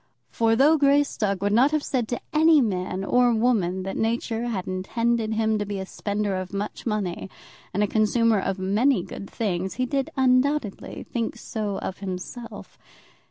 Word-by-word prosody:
For 225 -1 +2
though 295 +6 +5
Greystock 275 -9 +2
would 205 0 +1
not 250 +6 +5
have 305 -1 0
said 245 -4 -1
to 240 - -3
any 315 0 +6
man 185 -5 -1
or 245 +4 +3
woman 200 -6 +1
that 195 - -4
nature 230 +1 -1
had 200 -6 -3
intended 220 +4 -1
him 220 -1 +1
to 205 - -1
be 205 -1 -3
a 190 - -4
spender 205 0 -2
of 185 -1 -4
much 205 +4 -4
money 200 -4 -2 0.4
and 205 +3 +1
a - - +2
consumer 220 +1 +2
of 195 0 -2
many 200 +3 +2
good 195 +1 -8
things, 190 -4 -2
he 255 - 0
did 270 +1 -1
undoubtedly 260 -3 +1
so - - -27
think 230 -1 -1 0.5
of 190 - -5
himself. 195 +5 -7
220 Hz, 170 wpm, -25 LUFS, 195-245 Hz, 0.5 s, any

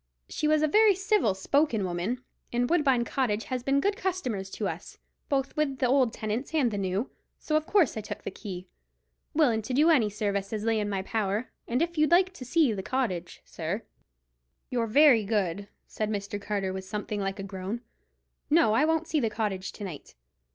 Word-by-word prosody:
She 305 - -1
was 310 0 +3
a - - +4
very 420 +5 +5
civil 390 - +2
spoken 240 +3 +1
young 190 - -1
woman, 195 +9 -2 0.3
and 245 +1 +1
Woodbine 270 -7 +3
Cottage 225 -4 0
has 255 -1 -3
been 275 +3 +2
good 400 +7 +1
customers 255 - -2
to - - -3
us, - - -7 0.3
both 275 -1 0
with 295 -3 0
the 260 - +1
old 255 -1 +3
tenants 225 +9 -3
and 265 -7 +3
the 205 - -2
new; 195 +6 -1 0.3
so 305 - -2
of 310 0 +1
course 390 -9 +3
I 220 - -3
took 210 0 -7
the - - -4
key, 185 -2 -7 0.7
willin' 250 -8 +3
to 250 +4 -3
do 310 +5 +5
any 240 -9 +4
service 200 -1 -2
as 215 -1 -2
lay 225 -1 +2
in 205 -1 -1
my 195 -2 -2
power. 210 +2 -1 0.2
And 250 +6 +1
if 340 -1 -3
you'd 305 - +4
like 365 +2 +4
to 275 - -9
see 295 -3 +3
the 195 - -3
cottage, 190 -8 -3
sir——" 180 +7 -4 0.9
"You're 235 -2 0
very 260 -1 +6
good," 200 -2 -1 0.2
said 215 -1 -3
Mr. 205 -1 -3
Carter, 200 -2 -2
with 190 0 -5
something 210 +1 -4
like 195 +1 -2
a 195 - -5
groan. 195 +4 -5 0.7
"No, 305 -8 +4
I 255 +7 +4
won't 320 0 +1
see 310 - +1
the 230 -5 +1
cottage 210 -4 -2
to - - -8
night. 170 - -8
225 Hz, 205 wpm, -28 LUFS, 200-295 Hz, 0.9 s, very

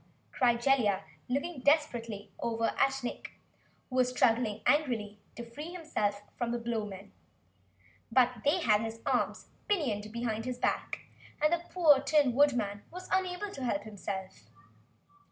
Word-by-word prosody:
cried 240 -2 +3
Jellia, 240 -8 +2 0.3
looking 280 +4 -2
desperately 240 -8 +1
over 230 -1 0
at 270 -1 +2
Nick 245 - -5 0.5
who 255 - -4
was 250 -1 +4
struggling 230 -4 +2
angrily 230 -9 +1 0.2
to 235 0 -7
free 295 +8 -7
himself 210 - -2
from 240 -1 -2
the 240 - 0
Blowmen. 215 -5 -4 1.0
But 250 -1 +3
they 310 +6 +3
had 215 -7 +4
his 225 0 -5
arms - - 0 0.2
pinioned 225 - 0
behind 225 -1 -2
his 250 -1 -3
back, - - -1 0.4
and 305 +2 +3
the 345 0 -1
poor 315 -6 +5
Tin 280 -2 +3
Woodman 235 -7 +2
was 365 +2 -9
unable 380 +2 0
to 275 - -7
help 200 -5 0
himself. 195 -3 -7
245 Hz, 140 wpm, -31 LUFS, 220-290 Hz, 1.0 s, poor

